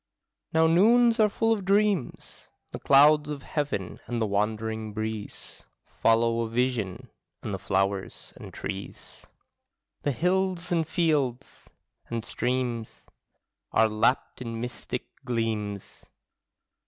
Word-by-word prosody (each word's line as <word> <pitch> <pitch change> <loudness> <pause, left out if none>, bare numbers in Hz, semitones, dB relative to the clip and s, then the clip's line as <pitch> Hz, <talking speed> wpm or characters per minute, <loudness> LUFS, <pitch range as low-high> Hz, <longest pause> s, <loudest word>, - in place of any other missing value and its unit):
Now 160 0 +4
noons 230 +8 +5
are 215 -1 +5
full 225 +2 +1
of 205 -3 -3
dreams; 200 - 0 0.2
The - - -6
clouds 150 +2 +5
of 145 -2 -5
heaven 105 - -3
and 120 -1 -2
the 110 - +1
wandering 110 +1 -2
breeze 110 -1 -6 0.2
Follow 115 +1 +2
a 115 - -2
vision; 115 -5 -2 0.3
and 105 - -4
the 95 - -3
flowers 95 +1 -2
and - - -10
trees, 95 +1 -8 0.7
The 145 - 0
hills 180 +4 0
and 165 -3 +1
fields 145 -6 -1 0.4
and 115 -1 -3
streams, 120 -1 -2 0.7
Are 110 - +5
lapped 110 +5 0
in 115 -2 -5
mystic 120 +1 -5 0.2
gleams. 110 -4 -3
120 Hz, 115 wpm, -27 LUFS, 110-160 Hz, 0.7 s, noons